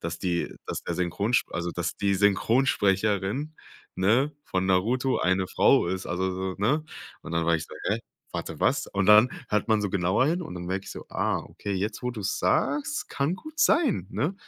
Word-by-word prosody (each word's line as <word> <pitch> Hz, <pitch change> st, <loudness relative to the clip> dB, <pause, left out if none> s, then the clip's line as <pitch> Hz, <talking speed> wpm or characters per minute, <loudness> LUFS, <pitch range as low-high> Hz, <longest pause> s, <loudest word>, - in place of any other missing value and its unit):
dass 85 Hz, 0 st, -4 dB
die 90 Hz, -2 st, -1 dB
dass -, -, -4 dB
der -, -, -3 dB
Synchronsp 100 Hz, +7 st, 0 dB
also, 85 Hz, +1 st, -2 dB
dass 85 Hz, -1 st, -3 dB
die 100 Hz, -1 st, +1 dB
Synchronsprecherin, 105 Hz, -, +1 dB, 0.4 s
ne, 120 Hz, +10 st, +2 dB
von 95 Hz, 0 st, -1 dB
Naruto 120 Hz, +8 st, +2 dB
eine 95 Hz, 0 st, +1 dB
Frau -, -, +4 dB
ist”, 95 Hz, +2 st, -3 dB
also 95 Hz, +2 st, -1 dB
so, 95 Hz, 0 st, -3 dB
ne? 135 Hz, +10 st, +1 dB, 0.4 s
Und -, -, -8 dB
dann 85 Hz, 0 st, +1 dB
war 85 Hz, -, +4 dB
ich 80 Hz, -, -1 dB
so: -, -, -11 dB
„Hä, -, -, +1 dB, 0.3 s
warte, -, -, -5 dB
was?“ -, -, +2 dB
und 100 Hz, -1 st, -1 dB
dann 105 Hz, +3 st, +8 dB, 0.2 s
hört 105 Hz, +1 st, 0 dB
man 110 Hz, -1 st, +3 dB
so 100 Hz, -, -1 dB
genauer 95 Hz, +6 st, +2 dB
hin 170 Hz, +4 st, +1 dB
und 155 Hz, -, -7 dB
dann 90 Hz, -1 st, -6 dB
merke 95 Hz, +2 st, -2 dB
ich -, -, -7 dB
so: -, -, -8 dB
„Ah, -, -, 0 dB
okay, 100 Hz, -, -6 dB
jetzt, 105 Hz, +5 st, -3 dB
wo 125 Hz, -, -1 dB
du's 105 Hz, -5 st, -3 dB
sagst, 145 Hz, +1 st, 0 dB
kann 140 Hz, +5 st, 0 dB
gut 310 Hz, +8 st, -8 dB
sein“, 255 Hz, -, +3 dB
ne? 155 Hz, +9 st, -1 dB
100 Hz, 200 wpm, -26 LUFS, 95-130 Hz, 0.4 s, dann